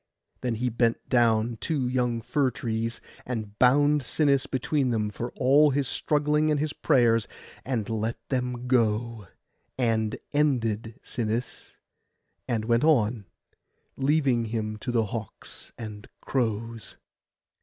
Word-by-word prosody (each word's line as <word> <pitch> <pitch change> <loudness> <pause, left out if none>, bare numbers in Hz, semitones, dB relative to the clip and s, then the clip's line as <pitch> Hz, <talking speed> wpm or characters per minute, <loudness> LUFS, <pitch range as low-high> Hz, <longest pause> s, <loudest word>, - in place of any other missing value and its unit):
Then 125 -2 -1
he 125 +3 -1
bent 115 0 0
down 115 -1 +2
two 140 -1 -1
young 125 -2 0
fir 135 +3 +1
trees, 115 -1 -3 0.2
and 110 -4 -5
bound 145 +4 +4
Sinis 140 +1 +1
between 135 +1 0
them 105 -3 0
for 120 +3 -4
all 145 +4 +5
his 140 -1 0
struggling 150 +2 +1
and 150 -1 +2
his 155 0 -1
prayers; 115 -6 +3 0.4
and 120 -5 -2
let 110 0 -2
them 125 -2 -2
go, 115 -3 +1 0.5
and 110 -3 0 0.2
ended 115 -7 0
Sinis, 115 +1 -4 0.7
and 110 -2 -1
went 115 +2 +2
on, 120 -9 +2 0.7
leaving 135 -4 +2
him 110 -1 -3
to 120 - -4
the 115 -2 +2
hawks 110 -1 -7
and 105 -2 -8
crows. 115 -3 -3
120 Hz, 125 wpm, -27 LUFS, 110-135 Hz, 0.7 s, all